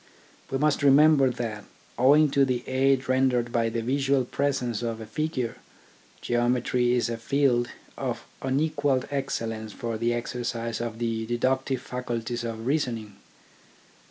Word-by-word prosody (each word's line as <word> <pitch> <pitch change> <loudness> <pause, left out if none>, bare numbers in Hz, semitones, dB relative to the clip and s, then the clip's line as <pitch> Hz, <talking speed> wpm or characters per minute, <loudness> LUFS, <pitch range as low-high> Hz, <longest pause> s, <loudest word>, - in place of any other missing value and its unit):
We 135 - -1
must 150 +1 +2
remember 140 0 +6
that, 115 -4 -4 0.3
owing 145 +4 +5
to 140 0 +4
the 125 -2 -1
aid 135 0 +2
rendered 130 -2 +2
by 115 -1 +1
the 115 0 -3
visual 135 +1 +1
presence 125 -4 -1
of 115 -2 -3
a 110 - -7
figure, 130 -1 -3 0.6
Geometry 120 0 +1
is 120 -3 +1
a 115 -1 -3
field 125 -1 +2 0.3
of - - -3 0.2
unequalled 140 -1 0
excellence 115 -6 -3
for 115 -2 -4
the 120 +1 +1
exercise 115 -1 -3
of 115 -1 -4
the 115 -1 -2
deductive 130 +2 0
faculties 120 -2 -4
of 115 -1 -5
reason 130 -4 0
ing. 105 -2 -11
125 Hz, 140 wpm, -26 LUFS, 115-135 Hz, 0.6 s, remember